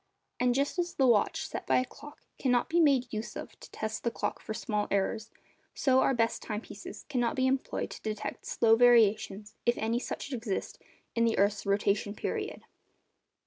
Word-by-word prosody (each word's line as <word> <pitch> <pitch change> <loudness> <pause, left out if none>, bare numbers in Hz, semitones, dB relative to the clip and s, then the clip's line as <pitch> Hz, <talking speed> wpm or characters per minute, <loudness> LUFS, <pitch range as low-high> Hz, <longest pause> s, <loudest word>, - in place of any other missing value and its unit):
And 245 -1 +2
just 280 +6 0
as 350 0 -1
the 270 - +3
watch 230 -5 +3
set - - -6
by - - +4
a 255 - +2
clock 290 +3 -13 0.2
cannot 250 -3 +2
be 340 - +2
made 275 -7 +3
use 215 +1 -4
of - - -8
to - - -12
test 220 0 -4
the 235 - +2
clock - - -3
for - - -7
small 210 -1 -1
errors, 210 +3 0 0.5
so 260 -1 +3
our 270 - +3
best 230 -1 +1
time 210 -1 -4
pieces 200 - -10
cannot 250 -1 0
be 260 -2 +1
employed 265 0 -1
to - - -9
detect 215 -1 -5
slow 225 -1 +4
variations, 220 -3 +4
if 240 0 +2
any 225 +2 0
such 270 - -5
exist, 225 -5 -3 0.3
in 230 - +2
the 230 -1 +2
earth's 200 0 +1
rotation 200 +1 +1
period. - - -4
230 Hz, 185 wpm, -30 LUFS, 215-255 Hz, 0.5 s, by